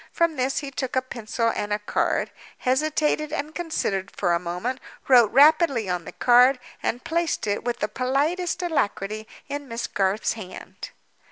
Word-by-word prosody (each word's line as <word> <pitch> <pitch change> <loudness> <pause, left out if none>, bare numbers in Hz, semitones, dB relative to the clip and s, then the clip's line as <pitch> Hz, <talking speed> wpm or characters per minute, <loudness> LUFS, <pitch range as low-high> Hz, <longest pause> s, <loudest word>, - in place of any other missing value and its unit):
From 335 -2 +1
this 260 +2 0
he 275 - -6
took 260 -1 -4
a 260 - +3
pencil 230 -2 -2
and 205 - -3
a 210 - +2
card—hesitated 300 +7 -1
and 305 0 -3
considered 205 - -2
for 175 - +1
a 170 - +2
moment—wrote 230 +5 +1
rapidly 285 - +5
on 180 -2 -2
the - - -7
card—and 250 -1 +2
placed 335 0 -1
it, 205 -1 -1
with 240 -1 -3
the 210 - +1
politest 310 +10 -1
alacrity, 215 - -1 0.2
in 285 0 -5
Miss 230 -1 -4
Garth's 195 +2 0
hand. 195 -5 -9
255 Hz, 150 wpm, -24 LUFS, 210-300 Hz, 0.2 s, rapidly